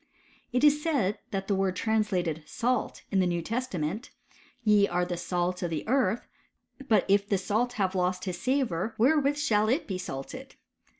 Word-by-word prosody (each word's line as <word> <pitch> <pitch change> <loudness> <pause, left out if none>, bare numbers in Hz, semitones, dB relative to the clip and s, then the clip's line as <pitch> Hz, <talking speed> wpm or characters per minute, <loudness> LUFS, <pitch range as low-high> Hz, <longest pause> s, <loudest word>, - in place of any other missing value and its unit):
It 250 +2 +1
is 295 0 +5
said, 270 - 0
that 195 -1 -3
the 205 - +1
word 190 -1 +1
trans 220 +1 +1
lated 175 -5 -1
salt 250 0 -1
in 195 - +2
the 185 - +3
New 175 -1 -1
Testament 220 - -3 0.3
— 250 - -30
Ye 210 -2 +5
are 180 0 0
the 175 0 -3
salt 180 +1 -2
of 175 - -1
the 160 +2 -4
earth: 250 -2 +1 0.6
but 215 -6 +4
if 200 +1 +3
the 200 - +3
salt 220 +6 0
have 195 -5 0
lost 180 0 0
his 180 -2 -4
savour, 245 -7 0
where 275 +8 +4
with 290 +1 0
shall 215 -6 +2
it 270 +8 +1
be 185 -2 -4
salted 135 -6 -7
205 Hz, 190 wpm, -28 LUFS, 180-245 Hz, 0.6 s, is